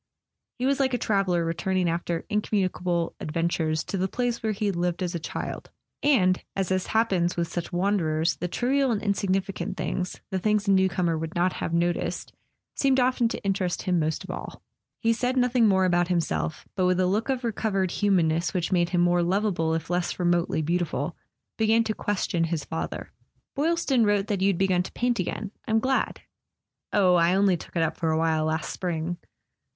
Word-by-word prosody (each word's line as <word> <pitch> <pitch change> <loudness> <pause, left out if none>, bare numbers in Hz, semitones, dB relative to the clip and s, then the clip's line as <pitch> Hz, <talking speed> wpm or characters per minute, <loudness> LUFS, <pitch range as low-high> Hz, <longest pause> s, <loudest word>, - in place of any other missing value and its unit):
He 250 - -2
was 275 +1 +2
like 260 -2 +2
a - - +1
traveller 195 -6 +1
returning 180 +2 0
after 170 0 -2
incommunicable 185 -5 0
adventures 160 -1 -1
to 195 - -4
the 190 - +1
place 240 +3 -2
where 220 - 0
he 210 +1 -2
had 200 -3 0
lived 175 +1 -1
as 175 0 -2
a 170 - -2
child; 160 - -5 0.3
and, 185 -11 +3
as 190 -1 0
happens 190 -7 +1
with 170 -1 0
such 170 0 -5
wanderers, 175 -4 +1
the 180 - -2
trivial 265 +8 +1
and 220 -4 +1
insignifi¬ 195 -1 0
cant 185 +2 -5
things, 180 -1 -3
the 190 - 0
things 210 +1 +1
a - - +4
newcomer 180 -3 +2
would 160 0 -5
not 180 +1 +2
have - - -4
noticed, 170 +1 -1 0.4
seemed 270 -1 +2
often 250 -1 +2
to - - -5
interest 190 -3 -1
him 180 -2 +1
most 155 0 -1
of - - -6
all. - - -8 0.4
He 230 0 +2
said 250 +3 -1
nothing 250 -2 +4
more 190 -2 +3
about 175 -1 +2
himself, 170 -3 -1
but 185 -2 +2
with 180 0 +2
the 185 - +2
look 210 +7 0
of 260 -1 -1
recovered 200 -5 0
humanness 175 -4 +1
which 175 0 -1
made 175 -2 +2
him 175 -1 +1
more 175 0 +3
lovable 175 -3 +1
if 165 +1 -4
less 175 0 -1
remotely 175 -2 +1
beautiful, 165 -2 -1 0.4
began 220 +1 +4
to 220 - -1
question 190 -5 -1
his 160 -3 -3
father. 160 - -5 0.4
"Boylston 295 -4 +2
wrote 205 -2 +2
that 200 -3 -1
you'd 195 -2 +2
begun 185 -1 +2
to 180 - -6
paint 245 -1 0
again. 195 +3 -3 0.2
I'm 220 - +2
glad." 260 +4 0 0.7
"Oh, 185 -3 +4
I 175 +1 +4
only 195 -1 +4
took 170 - -10
it 165 - +2
up 160 0 -1
for 165 - 0
a 160 - +2
while 160 -1 +1
last 160 0 -1
spring." 175 -1 -3
185 Hz, 190 wpm, -26 LUFS, 170-210 Hz, 0.7 s, a